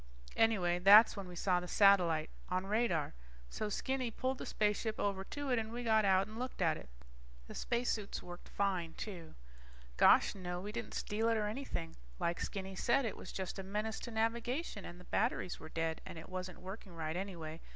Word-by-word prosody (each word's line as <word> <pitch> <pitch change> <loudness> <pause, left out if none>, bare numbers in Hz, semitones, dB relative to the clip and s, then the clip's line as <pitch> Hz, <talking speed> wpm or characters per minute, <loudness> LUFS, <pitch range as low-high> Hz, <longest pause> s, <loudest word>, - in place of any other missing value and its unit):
Anyway 180 -6 +3
that's 205 +5 +8
when 200 -3 -6
we 180 - -9
saw 180 0 +2
the 180 - -6
satellite 175 -6 +4 0.2
on 185 +1 0
radar. 205 -7 +1 0.4
So 215 - -3
Skinny 260 +3 -1
pulled 260 +3 -2
the - - -5
spaceship 215 +1 0
over 195 -1 0
to 285 +3 -4
it 245 - +3
and 220 0 -4
we 240 +1 -4
got 220 -2 +4
out 190 0 +4
and 215 +3 -9
looked 255 +1 -4
at 165 -4 +3
it. 65 - -10 0.6
The - - -8
spacesuits 235 -4 -2
worked 175 0 -10
fine, 185 -5 -1
too. 175 -7 -7 0.6
Gosh - - +6
no, 180 -2 -4
we 205 +3 -5
didn't 235 0 -5
steal 220 +2 0
it 225 - +2
or 210 - 0
anything. 210 -7 -4 0.2
Like 170 0 0
Skinny 190 -1 -4
said, 250 +7 +2
it 220 - -2
was - - -9
just 190 0 -4
a - - -4
menace 210 +3 -2
to - - -6
navigation, 230 - -1
and 175 +1 -9
the - - -12
batteries 205 -2 -1
were 160 - -9
dead, 165 0 -2
and - - -9
it 160 - -9
wasn't 185 -1 -5
working 190 -1 -8
right 160 0 -3
anyway. 170 -4 -5
200 Hz, 200 wpm, -35 LUFS, 180-225 Hz, 0.6 s, that's